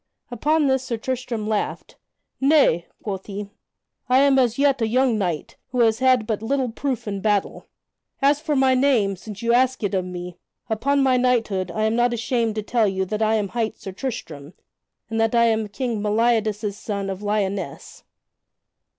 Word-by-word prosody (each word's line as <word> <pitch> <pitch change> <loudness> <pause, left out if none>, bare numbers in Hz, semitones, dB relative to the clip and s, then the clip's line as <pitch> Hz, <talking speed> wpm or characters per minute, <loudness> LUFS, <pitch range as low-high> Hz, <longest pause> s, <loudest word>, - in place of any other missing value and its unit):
Upon 300 +6 +1
this 265 -1 +2
Sir 250 -3 -3
Tristram 240 -2 -3
laughed, 215 -1 -3 0.4
"Nay," 270 - +3 0.2
quoth 195 -3 -5
he, 205 0 -6 0.6
"I 255 - +5
am 275 0 +5
as 240 -3 +2
yet 275 -2 +2
a 225 - +2
young 255 +1 +2
knight, 180 -7 -3
who 250 -1 0
has 225 -1 +3
had 255 -3 +3
but 215 -1 -2
little 260 +2 0
proof 255 -1 -3
in 200 -1 -3
battle. 205 -1 -1 0.5
As 285 +1 +3
for 310 -2 -1
my 265 -1 +4
name, 255 -7 +2
since 205 +3 -10
you 235 0 +2
ask 255 0 +2
it 205 - -1
of 190 -1 +1
me, 180 -1 -7 0.3
upon 275 +6 +1
my 260 -1 +3
knighthood 225 -7 +1
I 215 +5 -2
am 220 +1 +1
not 240 0 +2
ashamed 230 -1 -1
to 215 - -2
tell 225 0 +1
you 190 -1 -1
that 215 +3 -3
I 220 0 +3
am 205 -3 -1
hight 225 +2 -2
Sir 195 - -8
Tristram, 180 - -6 0.5
and 225 0 -1
that 225 +1 +1
I 235 0 +5
am 220 -1 +1
King 225 +1 -3
Meliadus' 215 -1 +1
son 200 -2 -4
of 195 0 -5
Lyonesse." 200 -6 -3
225 Hz, 185 wpm, -23 LUFS, 205-255 Hz, 0.6 s, I